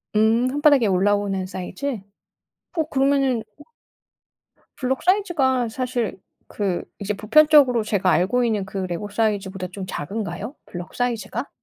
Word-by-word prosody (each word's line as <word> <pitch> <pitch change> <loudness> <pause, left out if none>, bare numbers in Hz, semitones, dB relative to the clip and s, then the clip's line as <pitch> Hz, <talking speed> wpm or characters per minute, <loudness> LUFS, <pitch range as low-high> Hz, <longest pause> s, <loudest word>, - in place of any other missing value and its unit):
음 220 +3 +3
손바닥에 285 -4 +4
올라오는 195 0 +1
사이즈. 205 +7 -4 0.8
어 325 - +2
그러면은 270 -4 +2
오 295 - -14 1.1
블록 260 0 -2
사이즈가 330 - +2
사실 245 -2 -2 0.3
그 195 -4 -2 0.2
이제 205 0 -2
보편적으로 255 +2 +5
제가 200 -3 +1
알고 230 +8 +2
있는 215 -4 0
그 195 - -7
레고 185 +2 -3
사이즈보다 200 -3 -1
좀 190 0 -6
작은가요? 200 - -5
블록 175 0 -8
사이즈가? 240 +1 -2
220 Hz, 305 characters per minute, -22 LUFS, 195-260 Hz, 1.1 s, 보편적으로